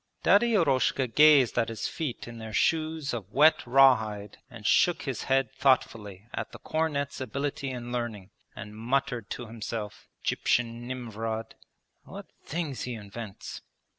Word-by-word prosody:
Daddy 225 +4 +4
Eroshka 135 - +2
gazed 140 -1 +5
at 115 0 +1
his 115 -1 -3
feet 145 -9 -5
in 120 -1 -9
their 110 -1 -8
shoes 155 +2 0
of 105 -4 -6
wet 150 +6 +5
raw 135 +1 +7
hide 105 -2 -7
and 115 -4 -12
shook 175 - +3
his 135 -6 -4
head 135 -3 +1
thoughtfully 105 -7 0
at - - -4
the - - -10
cornet's 150 -4 -2
ability 140 +2 -3
and 120 -2 -6
learning, 115 -5 -4 0.2
and 105 +1 -9
muttered 125 -1 -1
to 120 - -5
himself: 110 -1 -6 0.2
'Gyptian 120 0 0
Nimvrod! 115 -3 -4 0.5
What - - -10 0.2
things 155 -5 -3
he 125 -1 -4
invents!' 105 -1 -8
120 Hz, 145 wpm, -28 LUFS, 110-140 Hz, 0.5 s, raw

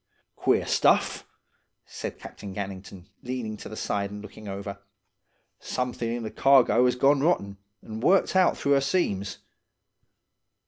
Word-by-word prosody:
"'Queer - - +2
stuff,' - - +2 0.6
said - - -6
Captain 100 -2 -9
Gannington, 95 -2 -7 0.2
leaning 125 -4 -4
to - - -9
the 110 - -8
side 100 -2 -2
and 105 +1 -8
looking 105 0 -11
over. 100 0 -6 0.8
'Something 125 -2 -3
in 120 - -4
the 110 - -5
cargo 125 0 +5
as 125 - +1
'as - - -14
gone 140 +1 +4
rotten, 100 - +1 0.3
and 110 0 -7
worked 190 +7 +3
out 185 -1 +4
through 140 - +2
'er 140 - +4
seams. 105 - -1
110 Hz, 145 wpm, -26 LUFS, 100-135 Hz, 0.8 s, cargo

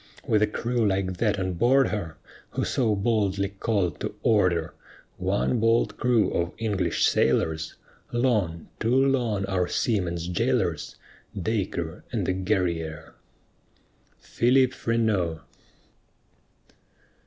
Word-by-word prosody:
With 105 -1 +2
a 105 - +4
crew 120 +2 -1
like 95 -3 0
that 105 0 +1
on 95 -1 -2
board 130 +9 +3
her 80 -7 -4 0.4
Who - - -1
so 115 -5 +1
boldly 100 -2 0
called 100 -3 -1
"to - - -4
order" 90 -7 +2 0.4
One 100 +6 0
bold 115 +1 +2
crew 120 -4 +2
of 85 +1 -1
English 105 -4 0
sailors, 80 -1 +1 0.4
Long, 105 -10 0
too 115 +3 +1
long 125 -7 +2
our 95 -2 0
seamen's 85 -6 -1
jailors, 90 - 0 0.4
Dacre 90 -5 -2
and 110 -6 -1
the 95 - +1
Guerrière! 85 -4 -2 1.1
PHILIP 130 +2 +2
FRENEAU. 105 -9 0
100 Hz, 110 wpm, -26 LUFS, 90-115 Hz, 1.1 s, a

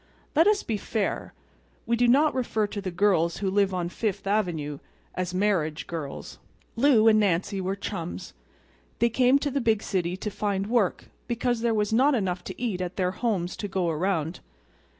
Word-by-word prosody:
Let 325 +5 +5
us 420 -1 +3
be 220 - -2
fair. 210 0 -3 0.5
We 235 - +1
do 245 +1 +3
not 290 +5 +4
refer 230 -4 0
to 205 0 -5
the 190 - -3
girls 175 -2 +2
who 195 -2 -1
live 200 0 +2
on 180 -2 -2
Fifth 200 0 -3
Avenue 170 -8 -1 0.3
as 185 -1 -2
"marriage 180 -5 0
girls." 155 -5 -6 0.4
Lou 235 -3 +5
and 215 -1 +6
Nancy 195 0 +1
were 190 +1 -1
chums. 185 -4 -6 0.6
They 235 - +3
came 255 +3 +4
to 285 0 -2
the 280 +1 0
big 220 -2 +1
city 180 -2 -1
to 210 +2 -4
find 200 -1 -1
work 220 -4 0 0.2
because 240 -1 -1
there 230 -1 +1
was 210 0 0
not 270 +5 +4
enough 185 -5 -1
to - - -7
eat 215 -7 -2
at 180 0 -4
their 180 -2 0
homes 190 -4 -1
to 205 - -4
go 185 -3 0
around. 165 0 -1
200 Hz, 185 wpm, -26 LUFS, 180-230 Hz, 0.6 s, and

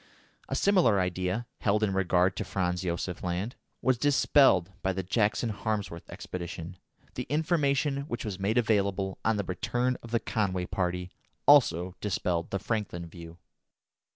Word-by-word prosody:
A - - -1
similar 180 - +4
idea, 90 +5 -1
held 105 +1 +1
in 100 -2 +1
regard 95 -1 +2
to - - -2
Franz 90 -2 -1
Josef 90 0 -3
Land, 90 +7 -2 0.3
was 130 -2 +2
dispelled 135 - +4
by 95 0 0
the 95 0 -3
Jackson 110 +4 +1
Harmsworth 100 -5 -3
expedition; 85 0 -6 0.4
the 125 - -5
information 145 -2 +1
which 120 -2 -4
was 100 -3 -4
made 105 +5 0
available 100 -4 +1
on 110 0 +2
the 100 - 0
return 120 +7 -1
of 120 - -10
the 115 0 +1
Conway 95 -6 -1
party 90 0 -2 0.3
also 95 - +5
dispelled 85 -3 -1
the 100 - -1
Franklin 100 -4 -3
view. 85 0 -11
100 Hz, 150 wpm, -29 LUFS, 90-115 Hz, 0.4 s, also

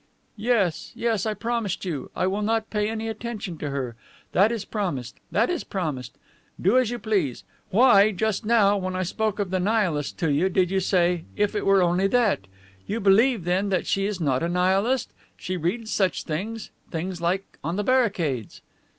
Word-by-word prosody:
"Yes, 210 -7 0
yes, 225 -3 0
I 215 - -1
promise 230 -5 -2
you. 150 -8 -4
I - - 0
will 195 +3 0
not 220 +1 0
pay 210 0 0
any 225 0 -3
attention 220 -6 -5
to 145 - -3
her. 130 -4 -3 0.4
That 200 +5 +4
is 225 -4 -3
promised. 145 - -3
That 230 +10 +2
is 350 - -2
promised. 150 - -4 0.4
Do 205 +8 +4
as 250 -4 +1
you 240 - -3
please. 190 - -1 0.3
Why, 210 -2 +6
just 215 +2 -1
now, 210 -2 +4
when 185 -1 -3
I 185 - 0
spoke 215 +3 -1
of 200 -3 -2
the 185 - +1
Nihilists 180 -7 0
to 165 -4 -1
you, 165 +7 +2
did 185 -1 +1
you 195 - +2
say, 180 -2 +1
'If 205 +1 +1
it 205 - -2
were 195 -1 +5
only 180 +3 +2
that!'? 215 - +1 0.4
You 215 +3 -2
believe, 215 +2 +4
then, 185 +4 0
that 185 -2 0
she 195 0 0
is 205 -3 -3
not 135 -6 +1
a 170 - 0
Nihilist? 195 +8 +1 0.3
She 185 - -4
reads 200 +7 -2
such 185 -7 +1
things 210 +8 -4 0.2
things 175 +1 -4
like 185 +3 -2
on 165 +4 -2
the 210 - -1
barricades..." 190 - 0
195 Hz, 190 wpm, -25 LUFS, 175-220 Hz, 0.4 s, Why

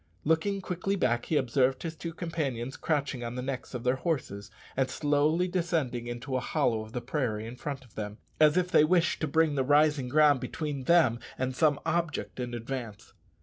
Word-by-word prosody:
Looking 180 +6 +1
quickly 185 +2 -2
back, 120 -9 0
he 155 - +2
observed 130 +1 +1
his 165 -1 -4
two 165 +2 -5
companions 145 -7 -3
crouching 140 -5 -1
on 120 +1 -4
the 125 - -3
necks 130 -1 -5
of 120 - -4
their 125 +1 +2
horses, 125 - -3 0.3
and 130 0 +1
slowly 150 +4 +2
descending 165 -10 -1
into 120 +3 -4
a - - +2
hollow 115 -2 0
of 110 0 -10
the 125 - -3
prairie 120 -5 -2
in 115 +2 -7
front 135 0 -6
of 120 - -22
them, 105 -1 -5 0.2
as 155 +2 +5
if 180 0 +1
they 150 - +6
wished 170 +1 +2
to 160 - +1
bring 160 +1 +2
the 135 -2 +1
rising 145 -1 +3
ground 145 0 +5
between 145 -1 -4
them 145 -9 +4 0.2
and 130 0 -2
some 150 +1 +3
object 165 -5 -1
in 120 -1 -3
advance. 120 -2 -6
140 Hz, 195 wpm, -29 LUFS, 125-160 Hz, 0.3 s, they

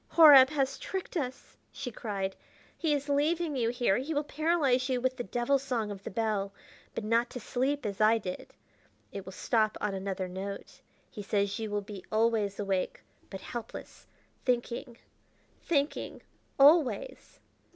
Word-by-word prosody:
"Horab 290 -5 +10
has 275 -3 -1
tricked 380 -1 -5
us," 260 -5 -4 0.2
she 245 - -6
cried; 195 -4 -3 0.4
"he 320 - -1
is 285 -1 0
leaving 305 +2 +1
you 235 -3 +1
here. 240 -5 +1
He 295 +4 -3
will 290 - +1
paralyze 290 -4 +1
you 255 -1 +1
with 260 +1 0
the 245 - -4
devil 245 +4 +1
song 240 -6 -2
of 195 -1 -7
the - - -5
bell, 210 -2 -1 0.4
but - - -3
not 230 +3 +2
to 250 - -7
sleep 265 +4 -1
as 200 0 -3
I 220 +2 +5
did: 185 -4 -6 0.6
it 200 -1 -7
will 190 - -8
stop 215 +2 +1
on 210 -1 -1
another 190 -1 -3
note. 195 +2 -7 0.3
He 210 - -7
says 200 +1 0
you 220 -1 -3
will 205 0 -2
be 200 -2 -9
always 215 -2 +1
awake, 195 -2 -2 0.3
but 195 -1 -7
helpless 235 +1 -8 0.4
thinking 240 0 -2 0.6
thinking 290 -2 -1 0.3
always!" 310 - +3
240 Hz, 160 wpm, -30 LUFS, 205-280 Hz, 0.6 s, Horab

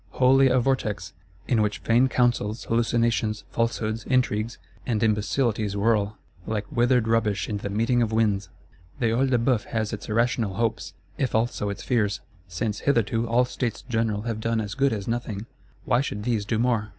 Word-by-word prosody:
Wholly 135 +1 +5
a 130 0 +3
vortex; 105 -7 -1 0.3
in 115 -4 +2
which 105 0 0
vain 120 +3 +3
counsels, 120 -4 +1
hallucinations, 115 -2 +1
falsehoods, 115 -1 -1
intrigues, 115 -3 0 0.3
and 115 -4 -1
imbecilities 110 -1 0
whirl; 105 -1 +1 0.3
like 105 -1 -2
withered 120 -1 +2
rubbish 105 -5 +1
in 105 - -2
the 100 - -5
meeting 115 +4 +1
of 115 -2 +1
winds! 105 -3 +1 0.5
The 115 - +2
Œil 130 +4 +2
de 125 - +3
Bœuf 120 -1 +1
has 110 -2 -2
its - - -6
irrational 115 -2 +1
hopes, 115 0 -2 0.2
if 130 -5 0
also 110 -2 0
its 100 - -5
fears. 105 -5 +1 0.3
Since 105 +4 -3
hitherto 115 -3 +1
all 120 +2 +3
States 125 -2 -3
General 110 -4 -1
have 115 -2 -3
done 115 0 0
as 105 -2 -3
good 135 +3 +2
as 105 -3 -4
nothing, 115 -3 -3 0.4
why 120 - +3
should 105 -7 -4
these 110 -3 0
do 110 +1 0
more? 115 -2 +1
115 Hz, 175 wpm, -25 LUFS, 105-120 Hz, 0.5 s, Wholly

